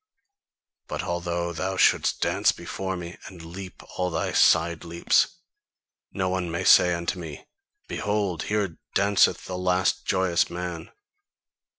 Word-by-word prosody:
But -, -, -4 dB
although 85 Hz, 0 st, -2 dB
thou 95 Hz, +3 st, -3 dB
shouldst -, -, +3 dB
dance -, -, +3 dB
before 95 Hz, -1 st, -5 dB
me, 85 Hz, 0 st, -8 dB
and 85 Hz, -3 st, -11 dB
leap 90 Hz, +2 st, -9 dB, 0.2 s
all 90 Hz, 0 st, +1 dB
thy 80 Hz, -2 st, -2 dB
side 80 Hz, 0 st, +3 dB
leaps, 85 Hz, 0 st, +2 dB, 0.8 s
no 95 Hz, -1 st, -1 dB
one 90 Hz, -1 st, -1 dB
may 85 Hz, -, -2 dB
say 90 Hz, -1 st, +6 dB
unto 85 Hz, +2 st, -3 dB
me: 80 Hz, -4 st, -8 dB, 0.4 s
'Behold, 100 Hz, -5 st, -1 dB
here 100 Hz, -5 st, -1 dB, 0.2 s
danceth 100 Hz, -2 st, +3 dB
the 90 Hz, -1 st, -5 dB
last 90 Hz, 0 st, +1 dB
joyous 95 Hz, -2 st, +2 dB
man! 90 Hz, -1 st, -5 dB
90 Hz, 130 wpm, -25 LUFS, 85-95 Hz, 0.8 s, say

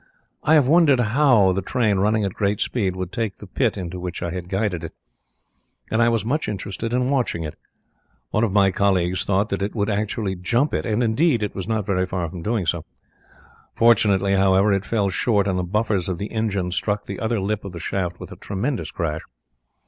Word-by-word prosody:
"I 155 Hz, -, +4 dB
had 150 Hz, -4 st, +5 dB
wondered 150 Hz, -2 st, +5 dB
how 120 Hz, -4 st, +4 dB
the 95 Hz, +1 st, -1 dB
train 110 Hz, 0 st, +1 dB
running 105 Hz, +2 st, +2 dB
at 100 Hz, -, -2 dB
a -, -, -15 dB
great 100 Hz, 0 st, 0 dB
speed 100 Hz, -7 st, -1 dB
would 95 Hz, -1 st, -4 dB
take 110 Hz, -1 st, -3 dB
the -, -, -11 dB
pit 110 Hz, +3 st, 0 dB
into 90 Hz, -1 st, -5 dB
which 90 Hz, -1 st, -5 dB
I 85 Hz, -, -2 dB
had 90 Hz, 0 st, -6 dB
guided 95 Hz, -3 st, -1 dB
it, -, -, -7 dB, 1.0 s
and 110 Hz, -, +2 dB
I 115 Hz, -, +5 dB
was 115 Hz, -3 st, 0 dB
much 150 Hz, +7 st, -1 dB
interested 105 Hz, +2 st, -4 dB
in 125 Hz, +1 st, +1 dB
watching 130 Hz, -11 st, 0 dB
it. 75 Hz, -, -5 dB, 0.8 s
One 110 Hz, -, +1 dB
of 110 Hz, -, +1 dB
my 100 Hz, -1 st, +4 dB
colleagues 95 Hz, -2 st, +1 dB
thought 100 Hz, +1 st, +1 dB
that 100 Hz, -, -2 dB
it 100 Hz, +3 st, -2 dB
would 105 Hz, 0 st, 0 dB
actually 105 Hz, -1 st, -1 dB
jump 120 Hz, +11 st, 0 dB
it, -, -, -1 dB
and 110 Hz, +2 st, +1 dB
indeed 120 Hz, +1 st, +2 dB
it 105 Hz, -, -3 dB
was 95 Hz, -1 st, -5 dB
not 110 Hz, -3 st, -1 dB
very 95 Hz, -2 st, 0 dB
far 90 Hz, -2 st, -2 dB
from 90 Hz, -, -7 dB
doing 105 Hz, 0 st, -1 dB
so. 85 Hz, 0 st, -1 dB, 0.9 s
Fortunately, 100 Hz, -4 st, +4 dB
however, 95 Hz, +1 st, +4 dB
it 100 Hz, 0 st, -1 dB
fell 100 Hz, -4 st, 0 dB
short, 100 Hz, +1 st, +1 dB
and 95 Hz, -2 st, 0 dB
the -, -, -1 dB
buffers 100 Hz, 0 st, 0 dB
of 90 Hz, -, -2 dB
the 100 Hz, +4 st, -5 dB
engine 100 Hz, -5 st, -1 dB
struck 105 Hz, +3 st, -1 dB
the 100 Hz, -, -6 dB
other 115 Hz, 0 st, 0 dB
lip 105 Hz, +2 st, -2 dB
of 100 Hz, -, -7 dB
the 85 Hz, -, -8 dB
shaft 90 Hz, 0 st, -3 dB
with -, -, -9 dB
a -, -, -8 dB
tremendous 120 Hz, +7 st, -3 dB
crash. 80 Hz, -3 st, -3 dB
100 Hz, 215 wpm, -22 LUFS, 95-115 Hz, 1.0 s, had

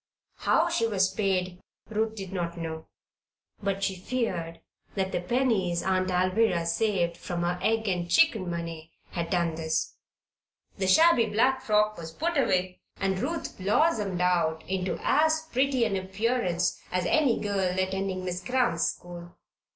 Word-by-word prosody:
How -, -, +2 dB
she 230 Hz, -, +1 dB
was 195 Hz, -3 st, +2 dB
paid, 185 Hz, -3 st, -1 dB, 0.3 s
Ruth 220 Hz, 0 st, -1 dB
did 195 Hz, -3 st, -7 dB
not 170 Hz, -2 st, -3 dB
know; 160 Hz, -1 st, -5 dB, 0.7 s
but 195 Hz, -1 st, -2 dB
she 195 Hz, -1 st, 0 dB
feared 180 Hz, -6 st, -3 dB, 0.4 s
that 190 Hz, -1 st, -1 dB
the -, -, -1 dB
pennies 190 Hz, -5 st, +1 dB
Aunt 185 Hz, 0 st, +1 dB
Alvirah 185 Hz, 0 st, +2 dB
saved 170 Hz, -1 st, 0 dB
from 175 Hz, 0 st, -4 dB
her 175 Hz, +1 st, -1 dB
egg 220 Hz, +2 st, +1 dB
and 175 Hz, -2 st, -1 dB
chicken 225 Hz, -, +3 dB
money 165 Hz, -1 st, -6 dB, 0.2 s
had 170 Hz, -1 st, -3 dB
done 170 Hz, -3 st, +1 dB
this. 160 Hz, 0 st, -2 dB, 0.8 s
However, -, -, -26 dB
the 190 Hz, -, 0 dB
shabby 315 Hz, -, +6 dB
black 255 Hz, +5 st, +2 dB
frock 215 Hz, -4 st, +2 dB
was 165 Hz, -1 st, -7 dB
put 340 Hz, -, -2 dB
away 185 Hz, -9 st, +1 dB, 0.2 s
and 190 Hz, -1 st, 0 dB
Ruth 325 Hz, -, -3 dB
blossomed 205 Hz, -, +1 dB
out 170 Hz, -3 st, +1 dB
into 190 Hz, -1 st, -1 dB
as 315 Hz, +1 st, +3 dB
pretty 260 Hz, -1 st, +2 dB
an 210 Hz, -3 st, -1 dB
appearance 190 Hz, -1 st, -1 dB
as 180 Hz, -1 st, 0 dB
any 280 Hz, -2 st, +3 dB
girl 195 Hz, -3 st, -1 dB
attending 190 Hz, 0 st, -1 dB
Miss 180 Hz, 0 st, -3 dB
Cramp's 240 Hz, -9 st, +1 dB
school. 175 Hz, -1 st, -11 dB
190 Hz, 150 wpm, -27 LUFS, 175-220 Hz, 0.8 s, shabby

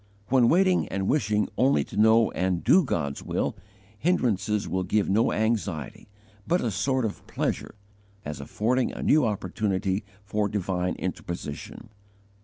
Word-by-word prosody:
When 125 Hz, -2 st, +4 dB
waiting 185 Hz, +1 st, +3 dB
and 95 Hz, 0 st, -2 dB
wishing 105 Hz, -7 st, +1 dB
only 135 Hz, +3 st, +4 dB
to -, -, -11 dB
know 110 Hz, +1 st, +5 dB
and 90 Hz, -2 st, -1 dB
do 190 Hz, -, +5 dB
God's 70 Hz, -, -2 dB
will, -, -, -2 dB, 0.4 s
hindrances 105 Hz, -, +1 dB
will 95 Hz, -, -1 dB
give 100 Hz, +3 st, +1 dB
no 110 Hz, +4 st, +2 dB
anxiety, 105 Hz, -, -2 dB, 0.4 s
but 175 Hz, +2 st, +2 dB
a 120 Hz, -, -1 dB
sort 130 Hz, +6 st, 0 dB
of 105 Hz, -, -6 dB
pleasure, -, -, -3 dB, 0.5 s
as 75 Hz, 0 st, -5 dB
affording 120 Hz, -, 0 dB
a -, -, -5 dB
new 155 Hz, 0 st, +4 dB
opportunity 100 Hz, -1 st, -1 dB, 0.2 s
for 105 Hz, +1 st, -1 dB
divine 90 Hz, -3 st, -1 dB
interposition. 85 Hz, -2 st, -6 dB
105 Hz, 140 wpm, -26 LUFS, 95-120 Hz, 0.5 s, know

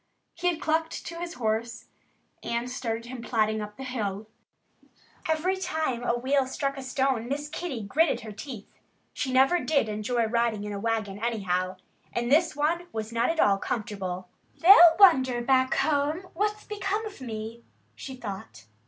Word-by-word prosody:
He 355 Hz, -, -2 dB
had 340 Hz, -3 st, +1 dB
clucked 320 Hz, +1 st, -1 dB
to 335 Hz, 0 st, -6 dB
his 345 Hz, 0 st, -5 dB
horse 230 Hz, 0 st, -2 dB, 0.6 s
and 235 Hz, +1 st, -2 dB
started 230 Hz, -3 st, -3 dB
him 245 Hz, 0 st, -7 dB
plodding 220 Hz, -2 st, 0 dB
up 210 Hz, 0 st, -8 dB
the 265 Hz, -, -7 dB
hill. 215 Hz, -5 st, -3 dB, 1.0 s
Every 325 Hz, +4 st, +1 dB
time 315 Hz, -9 st, -2 dB
a 240 Hz, 0 st, +1 dB
wheel 265 Hz, +2 st, +1 dB
struck 275 Hz, +1 st, -2 dB
a 270 Hz, -, -6 dB
stone 260 Hz, -2 st, 0 dB
Miss 290 Hz, +2 st, -2 dB
Kitty 295 Hz, -7 st, -4 dB
gritted 295 Hz, +10 st, +2 dB
her 220 Hz, -1 st, -8 dB
teeth. 220 Hz, 0 st, -9 dB, 0.3 s
She 265 Hz, -, -2 dB
never 270 Hz, +7 st, +4 dB
did 285 Hz, -8 st, +1 dB
enjoy 215 Hz, +3 st, 0 dB
riding 230 Hz, -2 st, 0 dB
in 210 Hz, 0 st, -4 dB
a 200 Hz, -, -4 dB
wagon, 215 Hz, -2 st, -2 dB
anyhow. 190 Hz, -5 st, -1 dB, 0.4 s
And 240 Hz, +1 st, -1 dB
this 320 Hz, +3 st, +4 dB
one 330 Hz, +4 st, 0 dB
was 220 Hz, +1 st, -5 dB
not 230 Hz, 0 st, +2 dB
at 330 Hz, 0 st, -1 dB
all 195 Hz, -1 st, +4 dB
comfortable. 190 Hz, -5 st, -4 dB, 0.3 s
"They'll 345 Hz, -2 st, +8 dB
wonder, 260 Hz, -11 st, +6 dB
back 260 Hz, +1 st, +2 dB
home, 305 Hz, +5 st, 0 dB
what's 420 Hz, +3 st, -1 dB
become 415 Hz, +1 st, -2 dB
of 410 Hz, -10 st, -9 dB
me," 225 Hz, -1 st, -6 dB, 0.3 s
she 265 Hz, -, -8 dB
thought. 220 Hz, -4 st, -8 dB
250 Hz, 165 wpm, -27 LUFS, 220-315 Hz, 1.0 s, They'll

